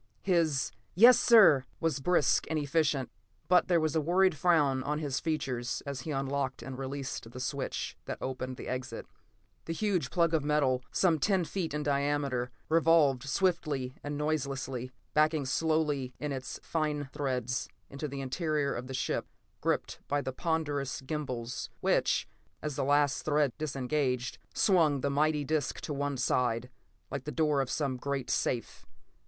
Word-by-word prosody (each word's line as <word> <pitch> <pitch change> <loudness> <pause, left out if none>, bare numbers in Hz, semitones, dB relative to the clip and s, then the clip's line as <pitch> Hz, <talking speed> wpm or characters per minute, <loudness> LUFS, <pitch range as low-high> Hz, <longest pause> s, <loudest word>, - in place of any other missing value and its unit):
His 165 -7 +2 0.2
"Yes, 240 +7 +8
sir!" 205 - +7 0.2
was 160 -4 0
brisk 175 +2 +2
and 160 - 0
efficient, 145 -3 0 0.4
but 180 -1 +4
there 175 -2 +4
was 155 -1 0
a 160 - +3
worried 180 +3 +3
frown 145 -5 +3
on 145 +3 -1
his 145 -3 -2
features 130 -7 -2
as 140 -3 -4
he 160 - -7
unlocked 135 -1 -2
and 135 - -6
released 135 -3 -5
the 125 - -9
switch 135 +1 -3
that - - -4
opened 130 -1 -4
the - - -7
exit. 130 -2 -4 0.6
The 165 - -3
huge 180 -7 0
plug 170 -2 +2
of 155 -3 +2
metal, 145 -4 +2
some 170 -4 +3
ten 190 +2 +2
feet 175 -1 -3
in 150 +1 -2
diameter, 140 -3 0 0.2
revolved 155 -5 +4
swiftly 150 -7 0
and 145 0 -3
noiselessly, 135 -4 -2 0.2
backing 155 -1 +3
slowly 150 -3 0
in 150 0 -3
its 135 -1 -5
fine 150 -3 -1
threads 125 -3 -2 0.2
into 140 +2 -5
the 140 -1 -5
interior 150 +1 -1
of 125 +1 -5
the 130 - -5
ship, - - -1 0.3
gripped - - -1
by 145 - +1
the 130 -2 -4
ponderous 145 -4 -1
gimbals 130 -4 -4
which, - - +2 0.4
as 150 -3 -3
the - - -1
last 145 0 +2
threads 145 -4 +2
disengaged, 130 -3 -1
swung 160 -8 +3
the 140 - 0
mighty 150 +1 +1
disc 155 -1 -1
to 150 - -4
one 140 -1 -2
side, 125 0 0 0.4
like 140 -2 -4
the 150 - -3
door 150 -3 +2
of 135 - -3
some 140 -4 -1
great 135 0 -3
safe. 120 -2 -2
145 Hz, 160 wpm, -30 LUFS, 130-155 Hz, 0.6 s, Yes